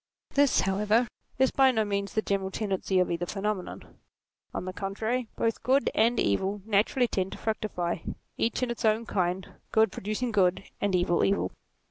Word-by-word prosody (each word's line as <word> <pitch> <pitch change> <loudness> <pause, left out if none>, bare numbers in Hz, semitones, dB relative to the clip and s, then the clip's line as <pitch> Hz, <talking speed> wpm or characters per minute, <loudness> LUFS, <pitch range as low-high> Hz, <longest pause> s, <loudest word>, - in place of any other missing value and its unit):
This, 280 -1 +4
however, 210 +5 +2 0.3
is 265 0 +3
by 270 -1 +5
no 220 -4 +1
means 200 -1 -2
the 215 - +2
general 195 -1 -1
tendency 195 -2 -1
of 180 -1 +2
either 170 +1 -2
phenomenon. 200 -1 -4 0.5
On - - -4
the 185 - -4
contrary, 220 +6 -2
both 230 -1 0
good 260 +2 +2
and 230 +3 +3
evil 190 - 0
naturally 220 +4 +2
tend 190 -3 -2
to - - -7
fructify, 205 -6 -2 0.4
each 230 +2 0
in 245 - 0
its 235 - -5
own 220 +1 +2
kind, 185 -3 -1 0.2
good 220 0 +4
producing 215 +4 -3
good, 185 -4 +2 0.2
and 200 -2 +1
evil, 175 -1 +2
evil. 200 - +1
205 Hz, 170 wpm, -28 LUFS, 190-230 Hz, 0.5 s, by